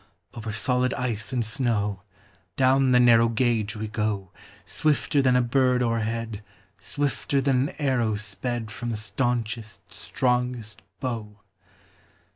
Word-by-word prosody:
Over 110 -2 -5
solid 125 +3 +1
ice 120 -5 -2
and 125 -3 0
snow, 110 -5 0 0.5
Down 130 0 +4
the 125 - +6
narrow 115 -1 +6
gauge 115 -3 0
we 110 0 -4
go 105 -3 -2 0.3
Swifter 150 -1 +1
than 130 -2 +3
a 125 - +4
bird 125 0 +2
o'erhead, 115 -2 -2 0.4
Swifter 145 0 -1
than 135 0 +2
an - - -12
arrow 125 -7 +1
sped 110 +2 -4
From 120 +1 -5
the 115 - -2
staunchest, 115 -2 -3
strongest 125 -4 -2 0.2
bow. 115 -6 -4
120 Hz, 125 wpm, -25 LUFS, 110-130 Hz, 0.5 s, the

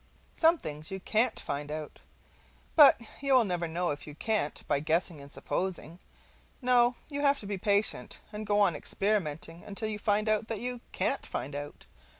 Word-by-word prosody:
Some 330 +1 +4
things 155 - -6
you 190 - -5
CAN'T 220 +5 +2
find 145 +1 -4
out; 155 0 -6 0.8
but 295 -6 +8 0.2
you 275 -1 +3
will 250 - +6
never 175 -4 -1
know 170 -1 -1
you 150 - -10
can't 210 -4 -1
by 145 - +2
guessing 160 +1 0
and 140 0 -12
supposing: 180 -2 -3 0.6
no, 245 -1 +4
you 285 -1 -3
have 280 -1 +3
to - - -9
be 200 -1 -4
patient 205 +2 +1
and 210 0 -6
go 205 0 +2
on 185 -6 +4
experimenting 170 -5 -2
until 210 +2 -3
you 210 -1 -4
find 210 +1 +1
out 215 0 +1
that 225 -3 -3
you 245 0 -4
can't 275 - +1
find 140 - -4
out. 145 0 -7
200 Hz, 175 wpm, -30 LUFS, 160-225 Hz, 0.8 s, but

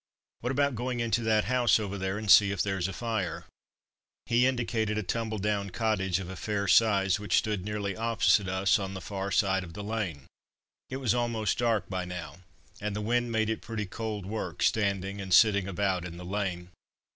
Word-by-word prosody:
"What 125 - -3
about 140 +1 +1
going 125 +1 -3
into 115 0 +1
that 110 -2 +2
house 120 -3 +3
over 100 -2 -4
there 95 0 -2
and 105 -2 +1
see 100 -1 +8
if 100 -2 0
there's 95 -3 -1
a - - -4
fire?" 110 -4 -3 0.8
He 120 +2 +3
indicated 115 -4 -1
a 105 - -1
tumbled 110 0 -3
down 100 -1 0
cottage 95 -4 0
of 95 - -6
a 95 - -7
fair 100 +1 -2
size, 100 -2 +4
which 105 - +1
stood 105 -4 0
nearly 100 -1 -3
opposite 115 -2 +2
us 95 +3 +2
on 95 -1 -4
the - - -4
far 100 +1 -4
side 95 -1 +2
of 85 -2 -10
the 105 - -6
lane. 100 -10 -3 0.6
It 130 - -4
was 130 -5 +1
almost 115 -4 0
dark 115 -4 +1
by 95 -1 -3
now, 85 -4 -7 0.4
and 105 0 -3
the - - -2
wind 120 +2 0
made 110 -1 +1
it 110 - -3
pretty 110 -2 -4
cold 105 -1 -5
work, 110 +3 -4
standing 100 -2 0
and 95 -1 -7
sitting 100 0 +5
about 95 -1 -1
in 85 -1 -7
the 90 - -8
lane. 90 -2 -3
105 Hz, 200 wpm, -29 LUFS, 95-110 Hz, 0.8 s, see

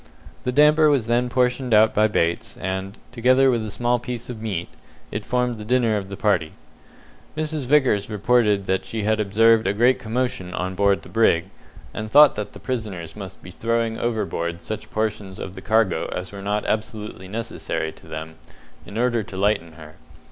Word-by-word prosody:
The 125 - +1
damper 150 +3 +5
was 140 -6 +2
then 120 +2 +1
portioned 125 -1 +1
out 110 +1 +5
by 110 +1 +4
Bates, 85 -5 -1
and, 95 +2 -4
together 130 +2 +4
with 115 -2 0
a 110 - -4
small 120 +4 0
piece 120 0 -6
of 110 -3 -8
meat, 95 -6 -3 0.4
it - - -4
formed 125 -2 0
the - - -6
dinner 120 -1 +2
of 100 -2 -3
the 100 0 -7
party. 95 -7 +1 0.8
Mrs. 155 -3 -2
Vickers 130 -8 +3
reported 105 -2 +2
that 95 0 0
she 110 -2 -4
had 110 +1 +1
observed 110 +1 +4
a 95 - +2
great 120 +4 +4
commotion 115 -5 -2
on 95 +1 -2
board 100 +1 +2
the - - -12
brig, 95 -5 +2 0.4
and 110 0 -5
thought 145 +4 +7
that 105 -1 -5
the - - -11
prisoners 100 -10 -5
must 100 -2 -9
be 90 - -10
throwing 115 +2 -1
overboard 85 -7 -2
such 110 +5 -5
portions 105 -3 -3
of 95 - -6
the - - -9
cargo 110 -6 +1
as 90 0 -5
were 100 -1 -8
not 105 +1 -1
absolutely 110 -4 -3
necessary 105 -6 -4
to - - -18
them, 80 +1 -7 0.5
in 100 - -7
order 120 -1 +1
to 100 -2 -9
lighten 95 -5 0
her. 80 -1 -13
110 Hz, 185 wpm, -23 LUFS, 95-120 Hz, 0.8 s, thought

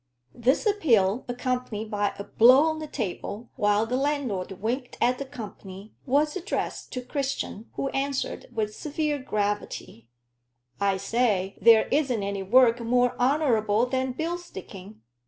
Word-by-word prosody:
This 255 - +1
appeal, 245 - +2
accompanied 245 -3 -3
by 205 -1 0
a 200 - -5
blow 255 +7 +6
on 315 0 0
the 310 - -5
table, 225 -2 -5
while 205 +1 +2
the 250 +3 -1
landlord 265 -10 -1
winked 240 +7 -4
at 250 +1 +2
the 275 - -4
company, 210 -5 -10
was 295 +3 +2
addressed 380 +2 -3
to 250 -2 -4
Christian, 270 -5 -4
who 275 - -2
answered, 275 0 -2
with 215 -3 -2
severe 300 -1 -2
gravity 205 - -3 0.7
"I 200 -1 +2
say 200 -2 0
there 225 -1 +6
isn't 265 -7 +1
any 200 0 -3
work 235 +4 +5
more 245 +1 +2
honorable 245 -5 +2
than 260 0 -1
bill 335 +6 -2
sticking." 195 - -11
245 Hz, 140 wpm, -26 LUFS, 205-275 Hz, 0.7 s, blow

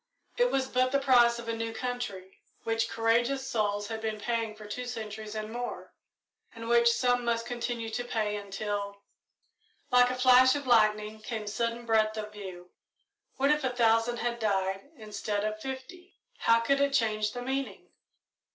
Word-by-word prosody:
It - - +3
was 265 - 0
but 255 0 +1
the 280 - +3
price 245 -4 +5
of 235 0 -8
a 230 - -1
new 225 0 -3
country, 225 -6 -5 0.2
which 225 0 0
courageous 240 +4 +1
souls 205 -2 -1
had 220 0 -5
been 220 -1 -3
paying 230 -1 -2
for 215 0 -11
two 250 +4 -5
centuries 220 -2 -6
and 215 0 -4
more, 245 0 -5 0.6
and 230 0 -7
which 235 0 +5
some 245 0 +1
must 230 -1 0
continue 240 -1 -3
to 245 - -2
pay 215 -3 -1
until 200 0 -4 0.9
Like 250 0 +6
a 255 0 -2 0.4
lightning 215 -2 +3
flash - - -21
came 220 -3 -3
sudden 230 +3 -2
breadth 220 -1 +2
of 215 0 -5
view. 185 -3 -9 0.7
What 275 +2 +3
if 300 -1 +1
a 260 - +1
thousand 235 -1 +2
had 235 0 -2
died 195 +1 -1
instead 210 -1 -3
of 215 0 -3
fifty; 270 - -8 0.2
how 230 0 +4
could 275 +4 +2
it 280 0 +2
change 215 -3 +1
the 245 0 -5
meaning? 270 +1 -4
230 Hz, 170 wpm, -29 LUFS, 215-245 Hz, 0.9 s, Like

